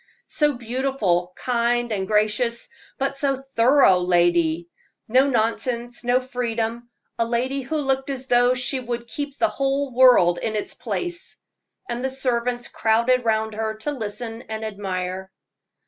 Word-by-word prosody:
"So 295 -1 +1
beautiful, 235 -7 -1
kind, 240 -1 0
and 190 -3 -2
gracious; 215 - +1 0.3
but 275 0 -2
so 275 -1 +1
thorough 265 -5 +4
lady 175 -2 +2 0.4
no 260 +5 +4
nonsense, 240 +1 -1
no 245 +1 +3
freedom 235 -2 -3 0.3
a 230 - +3
lady 255 +4 -1
who 270 +5 -3
looked 270 -2 -1
as 265 -1 -4
though 245 0 +4
she 255 +1 -1
would 240 -1 -5
keep 285 +3 -5
the 335 - +3
whole 275 -1 -1
world 240 -9 +6
in 220 -1 -2
its 210 - -3
place." 350 -1 -4 0.5
And 240 +1 -4
the 265 - 0
servants 245 -2 -1
crowded 235 +3 +2
round 220 -1 +1
her 220 0 -2
to 220 +7 -4
listen 225 -2 -5
and 220 0 -4
admire. 190 -2 -4
240 Hz, 145 wpm, -23 LUFS, 220-265 Hz, 0.5 s, world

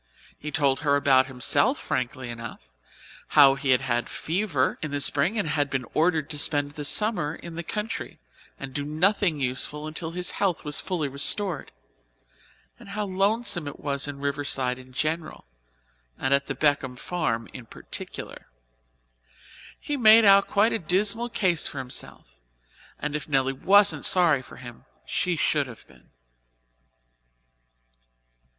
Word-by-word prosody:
He 150 - -7
told 140 -2 +1
her 145 -2 +2
about 135 -2 +4
himself 125 -3 +2
frankly 125 0 -3
enough 115 - -9 0.7
how 140 -2 +8
he 135 0 -4
had 130 0 +4
had 120 -2 -2
fever 165 -6 -1
in 155 - -4
the 145 0 -3
spring 145 +10 +2
and 200 -6 0
had 145 -2 0
been 130 -2 -2
ordered 160 -2 +1
to 150 - -1
spend 145 -1 +1
the 150 0 -7
summer 165 -2 +1
in 170 0 -10
the 170 - -5
country 210 +6 -5 0.4
and 135 -1 -7
do 145 - -3
nothing 165 +2 +1
useful 140 +3 -2
until 155 +1 -4
his 180 +1 -2
health 185 -6 -1
was 150 0 0
fully 175 -6 -2
restored, 150 +5 -1 1.1
and - - -13
how 210 +1 -3
lonesome 195 -3 +1
it 145 - -8
was 140 -1 -3
in 145 -1 -6
Riverside 140 -2 -1
in 130 0 -15
general 155 +4 -3 0.7
and 135 - 0
at 140 0 +1
the 135 - -3
Beckwith 135 -2 0
farm 115 -11 -2
in 120 -3 -10
particular. - - -9 1.3
He 290 - -3
made 220 -2 +7
out 200 0 +6
quite 210 +3 +2
a 225 - -1
dismal 200 +7 +1
case 180 -8 0
for - - -7
himself 125 - -7 0.6
and 150 0 -4
if 150 - -5
Nelly 135 -2 +1
wasn't 200 +9 +3
sorry 170 -7 +4
for - - -14
him, 120 -2 -12 0.2
she 180 - -1
should 145 -2 +1
have 115 -3 -13
been. - - -22
150 Hz, 150 wpm, -25 LUFS, 135-180 Hz, 1.3 s, how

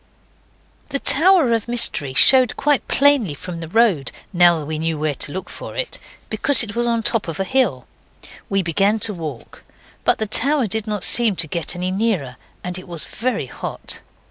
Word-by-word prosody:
The 275 - 0
Tower 320 -2 +4
of 230 -1 -2
Mystery 150 - 0
showed 255 - +5
quite 290 -1 +1
plainly 275 - +2
from 170 +3 -8
the 165 - -7
road, 195 -7 +1 0.2
now 175 -1 +5
that 155 - -6
we 155 +1 -4
knew 160 0 -2
where 150 0 -1
to 140 - -4
look 190 +3 -6
for - - -9
it, - - -4 0.3
because 245 +5 +3
it 205 -3 -6
was 240 0 -1
on 230 -1 0
the - - +3
top 225 -5 -1
of 165 +2 -6
a - - +1
hill. 210 - 0 0.6
We 195 -1 0
began 195 +6 +1
to 210 - -1
walk. 155 -9 -9 0.4
But - - +3
the 220 - -2
tower 270 +6 +2
did 220 +1 -2
not 210 -3 -2
seem 230 -4 +4
to 170 - +1
get 170 +2 -1
any 180 +1 -3
nearer. 190 - -2 0.3
And 180 0 -5
it 185 - -13
was 170 -3 -6
very 250 +2 -3
hot. - - -7
200 Hz, 195 wpm, -20 LUFS, 165-240 Hz, 0.6 s, showed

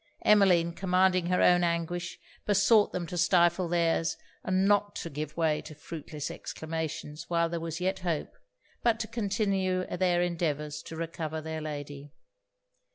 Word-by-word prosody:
Emmeline, 180 -5 +5
commanding 185 -1 +2
her 180 0 +2
own 175 0 +5
anguish, 170 +1 -2 0.3
besought 205 +1 +4
them 180 -1 -3
to 175 +1 -4
stifle 175 +1 +3
their's, 165 -1 +1 0.3
and 190 +1 +2
not 205 0 +2
to 170 - -5
give 150 +2 -5
way 160 -2 +1
to 155 - -11
fruitless 150 -1 -6
exclamations 160 -2 -5
while 170 -1 +2
there 170 0 -3
was 165 0 -4
yet 185 +2 -1
hope, 170 -4 -3 0.5
but 230 -2 +2
to 230 - -1
continue 195 -4 0
their 175 -1 +2
endeavours 150 -4 -2
to 165 - -9
recover 160 -1 -4
their 160 0 -5
lady. 145 -1 -6
170 Hz, 150 wpm, -29 LUFS, 160-185 Hz, 0.5 s, Emmeline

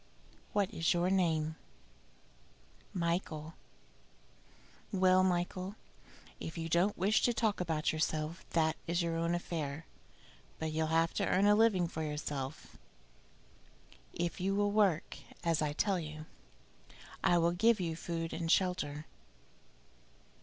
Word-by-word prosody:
"What 200 -2 0
is 165 +1 +1
your 175 +2 +1
name?" 160 -4 +1 1.3
"Michael." 170 -3 -2 1.4
"Well, 185 -1 +4
Michael, 185 +2 -1 0.6
if 160 - -6
you 165 0 -3
don't 175 +5 +2
wish 200 +4 +3
to 240 - +2
talk 215 -5 +1
about 160 -3 0
yourself, 155 +1 -2
that 160 -1 +2
is 170 +1 +1
your 165 -1 -1
own 170 +1 0
affair; 160 -3 -4 0.7
but 160 -1 -3
you'll 160 0 0
have 165 +1 +2
to - - 0
earn 190 +2 +3
a 205 - +6
living 210 -5 +4
for 160 - -5
yourself. 150 -2 -5 1.3
If 175 +2 -3
you 195 +2 +1
will 205 0 +2
work 200 -6 +1 0.2
as 165 -2 +1
I 150 -1 +1
tell 190 +5 +1
you, 155 -1 -7 1.0
I 175 - +4
will 170 0 +3
give 220 +5 +3
you 165 -3 -2
food 165 0 -4
and 165 -1 -1
shelter." 155 -5 +1
170 Hz, 130 wpm, -33 LUFS, 160-185 Hz, 1.4 s, a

